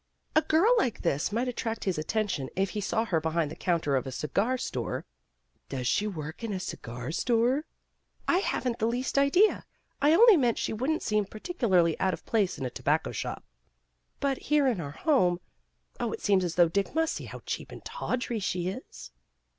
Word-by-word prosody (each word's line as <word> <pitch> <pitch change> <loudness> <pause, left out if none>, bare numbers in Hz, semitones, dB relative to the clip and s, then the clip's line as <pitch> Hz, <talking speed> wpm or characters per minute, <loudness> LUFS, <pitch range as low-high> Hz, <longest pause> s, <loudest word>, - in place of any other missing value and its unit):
"A 310 - +6
girl 325 +9 +4
like 245 - -1
this 160 0 0
might 235 +4 0
attract 230 -2 -3
his 185 -5 -1
attention 160 -5 -1
if 190 0 0
he 210 - -3
saw 220 +3 0
her 165 -7 0
behind 160 -1 0
the - - -6
counter 165 -6 0
of 130 0 -1
a - - -4
cigar 200 - 0
store - - -3 0.3
" - - -45
"Does 130 -2 -3
she 210 +9 +2
work 160 0 -6
in 225 - -2
a 190 - -2
cigar 120 -6 -6
store?" 245 - +1 0.6
"I 355 - +4
haven't 250 -10 -1
the 220 - +2
least 250 +4 0
idea. 355 +10 +4 0.4
I 295 +3 +5
only 450 -1 +8
meant 245 -5 +2
she - - -1
wouldn't 265 +9 -1
seem 210 -1 +1
particularly 195 - +1
out 190 -1 +1
of - - -20
place 210 -5 +1
in 135 - -4
a 125 - -3
tobacco - - 0
shop. - - -4 0.8
But 275 -2 0
here 300 -1 +2
in 235 -9 +1
our 145 - -5
home 180 - +2 0.6
Oh, - - -1
it 450 - -6
seems 195 -3 +3
as 175 -2 -2
though 175 -1 +6
Dick 200 - -1
must 325 0 +2
see - - -6
how - - -9
cheap - - -4
and - - -11
tawdry 250 - -2
she 180 -2 -1
is." 185 - -9
210 Hz, 200 wpm, -28 LUFS, 170-260 Hz, 0.8 s, only